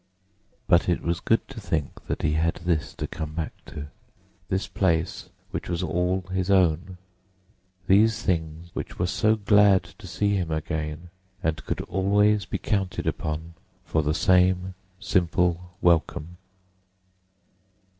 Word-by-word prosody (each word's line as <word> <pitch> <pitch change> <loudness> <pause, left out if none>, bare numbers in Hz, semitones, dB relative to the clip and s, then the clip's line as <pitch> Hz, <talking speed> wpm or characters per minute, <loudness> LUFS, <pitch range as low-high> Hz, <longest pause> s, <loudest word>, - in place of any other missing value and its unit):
But 85 +1 +4
it 90 - 0
was 85 0 0
good 115 - +1
to 135 -4 -8
think 80 -7 -2 0.2
he 75 - +2
had 80 +2 +1
this 85 -2 -1
to - - -3
come 80 -1 -6
back 80 -2 -3
to; 75 0 -7 0.6
this 95 +1 -1
place 85 -4 0 0.2
which - - -4
was 85 +1 -1
all 90 +1 0
his 95 0 -1
own, 90 -1 +2 0.9
these 110 +4 +4
things 85 -1 -2
which - - -6
were 90 - +1
so 110 +4 +2
glad 100 -3 +5
to 85 +2 -13
see 100 +2 0
him 90 -4 -2
again 80 +1 -3 0.3
and 80 0 -1
could - - -1
always 100 +2 +2
be - - -3
counted 95 -3 -1
upon 80 +2 -3 0.3
for 80 - +1
the 75 +1 0
same 90 0 +3 0.3
simple 90 -2 0
welcome. 85 0 +1
90 Hz, 135 wpm, -25 LUFS, 80-95 Hz, 0.9 s, glad